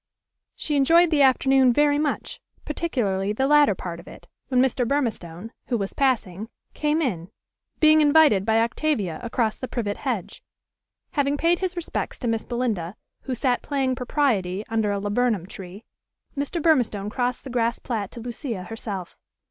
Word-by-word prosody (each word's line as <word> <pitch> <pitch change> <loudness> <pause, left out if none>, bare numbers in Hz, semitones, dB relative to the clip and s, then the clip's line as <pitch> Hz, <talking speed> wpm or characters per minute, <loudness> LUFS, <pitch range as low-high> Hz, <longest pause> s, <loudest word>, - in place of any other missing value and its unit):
She 300 - -2
enjoyed 330 +5 +5
the 300 -2 +3
afternoon 265 -1 +4
very 290 +2 +3
much, 300 -1 -3 0.2
particularly 210 - -1
the 265 +5 0
latter 290 -7 +5
part 170 -2 -6
of 170 - -14
it, - - -13 0.2
when 255 -2 +1
Mr. 255 -1 +2
Burmistone, 225 - -2 0.2
who 240 - 0
was 195 -2 -3
passing, 225 -6 0 0.2
came 305 +2 0
in, 180 - -3 0.5
being 310 0 +6
invited 295 -9 +5
by 220 +1 +3
Octavia 230 - -1
across 230 -2 -1
the 255 - -4
privet 220 -4 -3
hedge. 240 -10 -4 0.7
Having 285 -1 0
paid 335 +3 +2
his 370 -1 -2
respects 345 -2 -4
to 245 - -4
Miss 225 -1 -1
Belinda, 220 -8 -2 0.3
who 260 - -2
sat 245 0 0
playing 270 -3 -1
propriety 235 -7 0
under 220 -2 0
a 200 - -1
laburnum 205 -1 0
tree, 190 +2 -10 0.5
Mr. 285 +4 -2
Burmistone 240 -11 +1
crossed 245 0 -2
the 265 - -8
grass 235 -1 0
plat 215 -6 -4
to 240 - -10
Lucia 235 -4 -5
herself. 200 -4 -7
245 Hz, 160 wpm, -24 LUFS, 205-285 Hz, 0.7 s, being